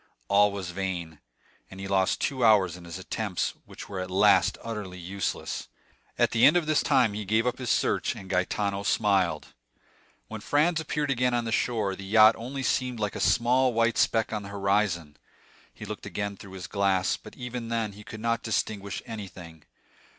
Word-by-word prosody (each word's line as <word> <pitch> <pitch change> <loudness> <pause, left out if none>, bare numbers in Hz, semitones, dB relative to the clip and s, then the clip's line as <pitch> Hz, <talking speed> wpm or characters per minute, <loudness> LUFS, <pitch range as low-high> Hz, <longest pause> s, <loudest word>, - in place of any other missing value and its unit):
All 105 +1 +5
was 95 -3 -5
vain; 85 -4 -4 0.5
and 95 - -11
he 95 - -5
lost 95 -1 +1
two 130 -3 -1
hours 100 -6 +5
in 90 -1 -12
his 85 +1 -7
attempts, 95 0 -2
which - - -10
were 100 -2 -5
at 90 0 -4
last 95 +2 +4
utterly 105 -5 -5
useless. 90 +1 -4 0.5
At - - +3
the 115 - +1
end 155 - +7
of 170 - 0
this 155 -1 +2
time 120 -5 +3
he 105 +1 -4
gave 110 +4 +1
up 125 - -1
his 125 -3 -4
search, - - +1
and 95 - -10
Gaetano 100 +2 -1
smiled. 95 -6 +1 0.8
When 110 -1 -7
Franz 155 +7 +2
appeared 150 -2 -2
again 125 -1 +1
on 120 -1 0
the 115 - -3
shore, 110 -5 0
the 100 - -9
yacht 110 +3 +6
only 135 +4 -5
seemed 125 -2 0
like 105 -1 -2
a - - -4
small 125 +1 +3
white 115 0 +2
speck 110 -1 +2
on 105 - -2
the 100 - -9
horizon. 100 -6 0 0.5
He - - -10
looked - - -7
again 100 -1 -3
through 95 -1 -12
his 95 -2 -7
glass, 95 -2 +1
but - - -13
even 125 -1 -6
then 115 -2 -1
he 105 +2 -12
could 110 0 -9
not 115 0 0
distinguish 100 -3 -2
anything. 90 -7 -9
105 Hz, 190 wpm, -27 LUFS, 95-115 Hz, 0.8 s, end